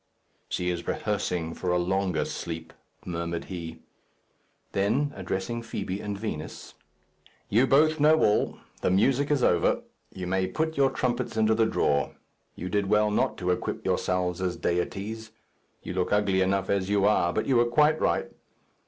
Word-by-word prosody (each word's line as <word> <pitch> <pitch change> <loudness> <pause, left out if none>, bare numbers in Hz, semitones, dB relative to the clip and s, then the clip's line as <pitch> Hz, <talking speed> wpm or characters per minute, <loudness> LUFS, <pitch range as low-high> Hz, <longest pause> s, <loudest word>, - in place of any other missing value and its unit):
"She 90 0 -1
is 85 -1 -5
rehearsing 90 -6 -1
for 90 - -4
a 90 - +3
longer 90 -2 0
sleep," 80 -1 -6 0.3
murmured 85 -1 -3
he. 80 -2 -7 0.9
Then, 120 +9 +1
addressing 95 +4 -3
Fibi 100 -4 -4
and 105 -1 -4
Vinos, 100 -8 -6 0.8
"You 120 +6 +4
both 155 +3 +4
know 155 +2 +5
all. 105 - +2 0.2
The - - +2
music 130 +9 +2
is 145 -4 +2
over. 85 -1 +3 0.3
You 95 - -6
may 95 +1 0
put 160 +6 -2
your 140 -1 +4
trumpets 120 -3 -2
into 110 0 +4
the 110 0 +3
drawer. 70 -9 +1 0.4
You 90 - -5
did 100 +1 0
well 105 +1 +3
not - - +1
to 90 -1 0
equip 90 - -3
yourselves 90 -1 0
as 90 -1 -1
deities. 105 +5 -3 0.5
You - - -5
look 90 0 -1
ugly 100 -2 +2
enough 95 0 +1
as 100 -1 0
you 100 -1 +3
are, 95 -4 +3
but - - -1
you 130 -3 +3
were 120 - +5
quite 150 +6 +3
right. - - 0
100 Hz, 160 wpm, -27 LUFS, 90-115 Hz, 0.9 s, know